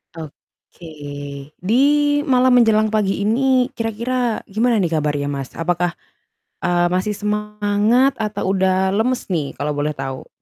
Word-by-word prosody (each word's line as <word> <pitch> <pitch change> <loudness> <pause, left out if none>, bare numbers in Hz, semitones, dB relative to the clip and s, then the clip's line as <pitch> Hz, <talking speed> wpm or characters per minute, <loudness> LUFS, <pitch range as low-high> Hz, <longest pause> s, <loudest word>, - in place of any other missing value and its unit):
oke, 160 +2 -13 0.8
di 210 +6 0 0.5
malam 255 -3 +3
menjelang 220 -2 +4
pagi 210 -2 0
ini 250 +4 +2
kira-kira 235 +1 -1
gimana 225 +2 +1
nih 175 -3 0
kabarnya, 145 -2 -1
Mas? 135 -2 -6
Apakah, 175 +1 0 0.7
eee, 175 0 +2
masih 185 +3 0
semangat 210 +4 +1
atau 205 -3 -2
udah 190 0 +1
lemes 250 +4 0
nih 160 -7 -2
kalau 145 0 -2
boleh 145 +1 -1
tahu? 135 -2 -6
205 Hz, 125 wpm, -20 LUFS, 175-225 Hz, 0.8 s, menjelang